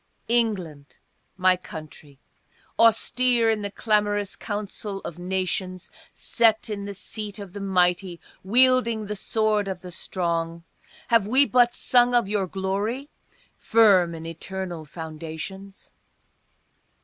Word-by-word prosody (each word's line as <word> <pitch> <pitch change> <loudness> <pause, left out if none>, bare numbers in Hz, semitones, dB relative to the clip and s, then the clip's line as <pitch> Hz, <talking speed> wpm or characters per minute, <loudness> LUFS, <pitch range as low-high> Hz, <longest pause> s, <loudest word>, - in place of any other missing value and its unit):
ENGLAND, 185 -12 -1 0.4
my 185 0 +4
country, 155 -5 -11 0.6
austere 230 +1 +4
in 215 -1 -1
the 205 - -3
clamorous 205 -1 0
council 205 -1 -5
of 170 0 -8
nations, 185 0 -3 0.2
Set 225 -1 +2
in 200 -1 -4
the 200 - -5
seat 210 +1 -6
of 200 -4 -9
the 205 - -6
mighty, 180 -2 +1 0.2
wielding 235 0 +3
the 210 +1 -4
sword 215 0 0
of 190 -2 -5
the 180 - -9
strong, 170 -2 -3 0.5
Have 230 -4 +4
we 265 +5 +5
but 245 -2 +3
sung 245 -1 +4
of 240 -5 +3
your 200 -2 0
glory, 200 - -3 0.5
firm 195 -7 +4
in 160 0 -8
eternal 175 0 -6
foundations? 160 +5 -8
200 Hz, 120 wpm, -24 LUFS, 180-220 Hz, 0.6 s, we